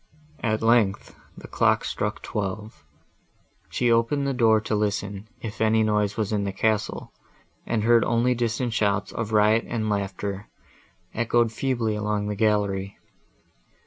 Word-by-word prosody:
At 110 -1 -1
length 115 -4 +2 0.2
the - - -10
clock - - +2
struck - - -3
twelve; 105 -1 -5 0.9
she 120 -1 +1
opened 115 +5 +2
the 140 - 0
door 115 -3 +4
to 110 - -3
listen, 105 -1 -2
if 110 -1 -6
any 110 0 +3
noise 105 -1 0
was 110 -2 -1
in 105 -2 0
the 100 - -2
castle, 105 +2 -1 0.5
and 115 -2 0
heard 115 0 +5
only 120 +2 +2
distant 120 0 -1
shouts 100 -2 0
of 115 -1 -4
riot 110 +1 +3
and 110 -2 -2
laughter, 100 0 -3 0.7
echoed 120 0 +1
feebly 120 -3 -1
along 105 0 -1
the 105 - -2
gallery. 100 -2 0
110 Hz, 145 wpm, -25 LUFS, 105-115 Hz, 0.9 s, heard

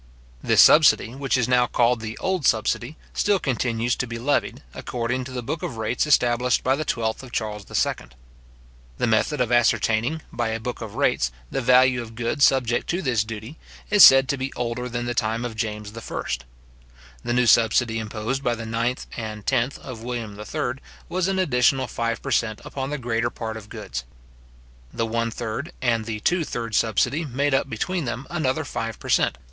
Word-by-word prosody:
This - - +6
subsidy, 150 -6 +6
which 135 0 0
is 125 -2 +1
now 125 -1 +3
called 120 0 +2
the 110 +2 -6
old 185 -1 -1
subsidy, 120 +5 0 0.2
still 205 -1 +2
continues 120 - -1
to 125 - -2
be 115 0 -5
levied, 140 +5 -1
according 125 +1 -3
to 130 - -8
the 125 -1 -4
book 150 +6 -4
of 115 - -5
rates 110 +6 -1
established 125 -3 +3
by 130 +1 +3
the 155 - -2
twelfth 110 -6 -2
of 130 -2 -12
Charles 105 -4 -4
II. - - -1 0.9
The - - +1
method 115 +6 +1
of 125 -1 0
ascertaining, 120 +4 +2
by 120 -1 -1
a 110 0 -2
book 120 +2 -5
of 110 -3 -7
rates, - - +1 0.2
the - - -1
value 125 0 +4
of 115 -1 -10
goods 120 +5 +2
subject 120 -3 0
to 175 +2 -1
this 120 -7 +1
duty, 110 +6 -8 0.3
is 205 -2 +8
said 135 0 +9
to 140 - 0
be 130 +1 -3
older 125 +1 -3
than 120 0 -3
the 120 - -2
time 115 0 -1
of 115 -2 -5
James 105 -1 -4
I. 115 - -5 1.0
The 120 - -1
new 125 0 +3
subsidy, 115 0 +3
imposed 110 +5 -3
by 120 -1 +1
the 115 -1 -7
ninth 115 +3 -2
and 110 -2 -6
tenth 130 0 0
of 125 -4 -9
William 120 -3 -4
III., 105 - -3 0.3
was 185 0 0
an 195 0 0
additional 130 -6 +2
five 115 -1 -3
per 140 - -4
cent. 110 -2 +1
upon 135 -1 -4
the 150 - -2
greater 120 -2 -1
part 110 -2 -6
of 105 -1 -10
goods. - - -6 0.9
The 115 - -1
one 115 +1 -1
third 115 +6 -5
and 115 -4 0
the 110 -1 -4
two 175 - +2
third 115 -6 -5
subsidy 120 +9 +1
made 140 0 -1
up 135 - +1
between 175 - -2
them 120 +2 -4
another 155 -2 -1
five 115 -5 -4
per - - -9
cent. 65 - +2
120 Hz, 195 wpm, -24 LUFS, 115-135 Hz, 1.0 s, said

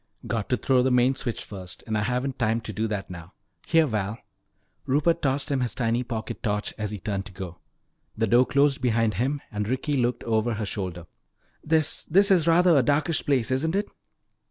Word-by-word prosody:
"Got 110 -3 -2
to 125 - +2
throw 130 0 +2
the 130 - +2
main 125 +1 +4
switch 125 -3 -4
first, 95 -3 -9
and 110 - -2
I 105 - +1
haven't 125 +4 -2
time 115 -1 +1
to 110 - -7
do 110 +3 -1
that 100 -3 -4
now. 85 0 -10 0.3
Here, 165 -1 +4
Val." 105 -4 -2 0.7
Rupert 150 +5 +2
tossed 135 +1 0
him 135 - +1
his 120 -2 -1
tiny 115 0 0
pocket 115 -3 -5
torch 105 -2 -2
as 110 -1 -3
he 105 - -5
turned 100 +1 -3
to - - -12
go. 90 -2 -8 0.6
The 115 - +2
door 120 +4 +4
closed 140 -1 +2
behind 115 -3 +2
him 135 +8 -1
and 105 -1 -3
Ricky 130 +3 -1
looked 120 -2 0
over 115 0 0
her 105 0 -3
shoulder. 90 -4 -5 0.6
"This 155 -1 0
this 195 +5 +4
is 170 -4 +4
rather 170 +1 +5
a 140 - +6
darkish 150 +5 +1
place, 130 -4 +1
isn't 160 +7 0
it?" 205 +1 -1
120 Hz, 205 wpm, -26 LUFS, 105-140 Hz, 0.7 s, a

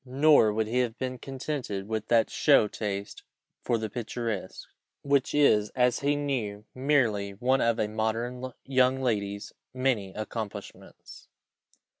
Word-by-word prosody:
Nor 135 -3 +4
would 110 +1 0
he 120 +4 0
have 120 -1 -1
been 130 -1 -4
contented 130 -7 -4
with 110 -1 -3
that 115 -2 +3
show 105 - +4
taste 100 -1 -5 0.4
for 120 - 0
the 110 0 -3
picturesque, 115 -3 -5 0.4
which 140 -1 +1
is, 105 -8 +4
as 125 -1 +2
he 145 +1 +1
knew, 120 -8 -3
merely 120 -8 +1
one 125 +5 +1
of 115 -1 +2
a 105 - +1
modern 115 +4 -2
young 130 0 +3
lady's 100 -4 -2 0.2
many 125 -7 0
accomplishments. 110 -1 -8
115 Hz, 135 wpm, -28 LUFS, 105-130 Hz, 0.4 s, Nor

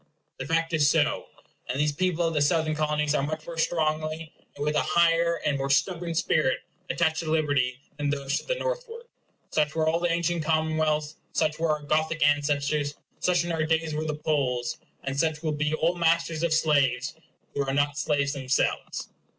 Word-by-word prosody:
The - - -4
fact 165 +1 0
is 150 -2 +4
so; - - +2 0.4
and 130 - -1
these 150 0 +2
people 175 +2 0
of 165 - 0
the 150 - +1
Southern 155 +1 +2
Colonies 150 -1 0
are 150 - +2
much 155 +2 -3
more 165 -1 -6
strongly, 155 -1 -1 0.2
and 145 - -3
with 150 0 0
an - - +4
higher 170 0 +3
and 140 -2 +1
more 135 0 -2
stubborn 170 +3 +1
spirit, 155 -4 +2 0.3
attached 160 -1 +1
to 165 -2 -3
liberty 140 -6 +1 0.2
than 145 -1 -1
those 140 -1 -1
to - - -14
the - - +1
northward. - - -4 0.5
Such 150 0 +1
were 160 -1 +1
all 165 +1 +2
the 175 0 +1
ancient 170 0 0
commonwealths; 155 -1 0 0.2
such 155 0 0
were 165 0 +1
our 150 -1 0
Gothic 155 +1 +1
ancestors; 145 0 +1 0.2
such 175 -1 +2
in 175 - -2
our 160 -1 0
days 160 0 0
were 155 +1 -2
the 155 -1 -2
Poles; 125 -6 -1 0.2
and 135 0 -2
such 160 0 0
will 155 - 0
be 150 0 -1
all 165 +2 +1
masters 165 -1 +1
of 170 -1 +1
slaves, 140 -5 +2 0.4
who 140 - 0
are 135 - -2
not 145 +1 +1
slaves 145 -1 0
themselves. 130 -2 -1
155 Hz, 190 wpm, -27 LUFS, 145-165 Hz, 0.5 s, is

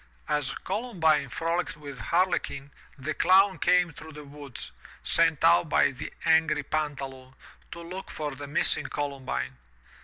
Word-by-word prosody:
As 145 -2 -1
Columbine 185 - 0
frolicked 165 +4 -2
with 140 -3 -9
Harlequin, 145 - 0 0.3
the 145 +3 -3
Clown 190 +5 +4
came 180 -2 +3
through 160 +1 -11
the 150 0 -9
woods, 140 -3 -9 0.3
sent 165 -3 +2
out 165 0 +5
by - - +4
the 130 - -7
angry 160 -2 +3
Pantaloon, 135 -3 -4 0.4
to 170 - -7
look 185 +3 -7
for 150 -1 -4
the 140 +1 -8
missing 145 - +1
Columbine. 130 - -3
150 Hz, 140 wpm, -27 LUFS, 140-170 Hz, 0.4 s, out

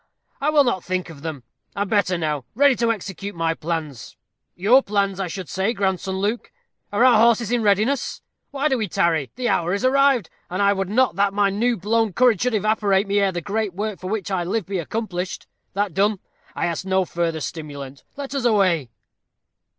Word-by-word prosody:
I 290 - +2
will 300 -2 +5
not 240 -9 -1
think 185 -1 -3
of 145 -3 -13
them. 155 -5 -6 0.3
I 200 - 0
am 200 - -7
better 195 -4 +2
now 150 -5 -2
ready 280 +1 +5
to 235 -1 +2
execute 200 -2 -5
my 165 -1 0
plans 155 -6 -5 0.4
your 225 +9 +5
plans 200 -4 -1
I 190 - -1
should 180 0 -6
say, 190 +8 -1
grandson 190 -2 -1
Luke. 210 +5 -2 0.4
Are 205 +5 +3
our 240 -4 +6
horses 235 0 +3
in 245 -1 +2
readiness? 215 +6 +1 0.3
Why 285 +1 0
do 265 -4 +1
we 215 - -1
tarry? 160 -5 +1
The 250 -1 -2
hour 175 -2 +1
is 205 - -2
arrived, 270 -7 +3 0.2
and 185 - -3
I 200 0 +4
would 195 -1 -2
not 240 -3 +2
that 200 0 +2
my 200 -1 +3
new 230 +4 +1
blown 215 +2 +1
courage 240 -3 +3
should 250 -2 +1
evaporate 205 -1 +2
ere 200 -1 +3
the 175 -1 -4
great 205 +1 -2
work 210 0 -3
for 185 - -6
which 205 -2 -3
I 185 -2 0
live 195 +3 -2
be 195 -1 -3
accomplished. 185 0 -4 0.3
That 200 -2 -1
done, 200 +4 +2 0.4
I - - -1
ask 170 0 -2
no 190 0 +1
further 170 -2 -2
stimulant. 140 -4 -7
Let 280 -1 -6
us 275 -3 -2
away." 185 - +2
200 Hz, 200 wpm, -22 LUFS, 175-225 Hz, 0.4 s, our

